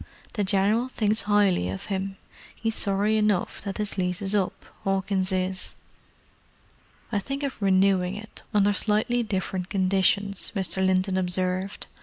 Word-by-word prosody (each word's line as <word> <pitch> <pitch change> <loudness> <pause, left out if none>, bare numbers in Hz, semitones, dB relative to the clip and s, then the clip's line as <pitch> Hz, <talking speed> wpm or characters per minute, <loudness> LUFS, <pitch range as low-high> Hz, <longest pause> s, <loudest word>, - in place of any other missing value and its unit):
The 210 - 0
General 205 +5 +2
thinks 215 -4 +1
'ighly 205 - +3
of 95 - -7
'im. 195 0 -2 0.5
'E's 225 0 +1
sorry 205 +1 +1
enough 210 -4 +1
that 200 -1 -5
'is 210 -2 -2
lease 180 0 -1
is 195 +1 -2
up, 195 -3 -1 0.2
'Awkins 195 0 0
is." 185 0 -1 1.4
"I 210 - +1
think 275 +7 -4
of 275 -1 -1
renewing 190 -1 +3
it, 220 +2 -9
under 205 -1 +3
slightly 215 +4 +1
different 190 -3 -3
conditions," 195 +1 +2
Mr. 190 -1 +1
Linton 185 0 +2
observed. 185 +2 -1
195 Hz, 140 wpm, -26 LUFS, 185-210 Hz, 1.4 s, ighly